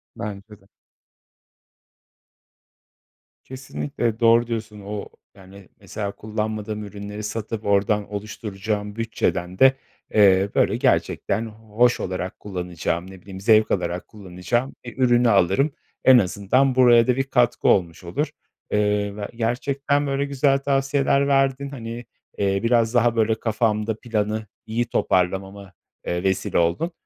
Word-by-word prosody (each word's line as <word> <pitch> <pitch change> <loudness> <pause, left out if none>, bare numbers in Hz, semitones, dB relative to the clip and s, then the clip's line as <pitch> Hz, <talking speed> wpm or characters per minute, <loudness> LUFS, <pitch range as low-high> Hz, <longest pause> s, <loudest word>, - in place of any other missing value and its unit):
Bence 105 +1 -7
de. 95 - -26 2.8
Kesinlikle. 115 - -4
Doğru 115 0 +4
diyorsun. 110 -3 -5
O, 100 +1 -6 0.3
yani, 95 0 -15
mesela, 100 -2 -5
kullanmadığım 110 0 -4
ürünleri 105 +1 -7
satıp 110 0 -4
oradan 100 +1 +1
oluşturacağım 105 0 -4
bütçeden 95 -5 -2
de, 135 0 +7 0.4
eee, 100 -1 +5
böyle, - - +3
gerçekten 115 - 0
hoş 110 +2 0
olarak 90 0 -4
kullanacağım, 90 -1 -4
ne 95 -2 -13
bileyim, 95 -1 -10
zevk 110 +1 +4
alarak 90 -1 -2
kullanacağım 105 +6 -3
bir 120 +1 -9
ürünü 120 -2 +4
alırım. 100 - +3 0.3
En 130 -1 +8
azından 115 +6 +2
buraya 120 -2 +6
da 125 - +3
bir 135 - 0
katkı 125 -3 +1
olmuş 85 -2 +2
olur. 140 - -2 0.4
Eee, 105 -1 +1
ve 105 -1 -5
gerçekten, 140 +5 0
böyle, 140 0 0
güzel 140 0 +2
tavsiyeler 140 0 +1
verdin. 135 0 +1
Hani, 120 -3 -7 0.3
eee, 100 -1 +1
biraz 115 -1 +2
daha, 120 -1 +3
böyle, 110 -1 +2
kafamda 110 -1 0
planı 110 -2 -2 0.2
iyi 115 +2 -1
toparlamama, 95 -1 -1 0.3
eee, 85 +1 -2
vesile 95 -1 0
oldun. 85 - +1
110 Hz, 125 wpm, -23 LUFS, 100-120 Hz, 2.8 s, En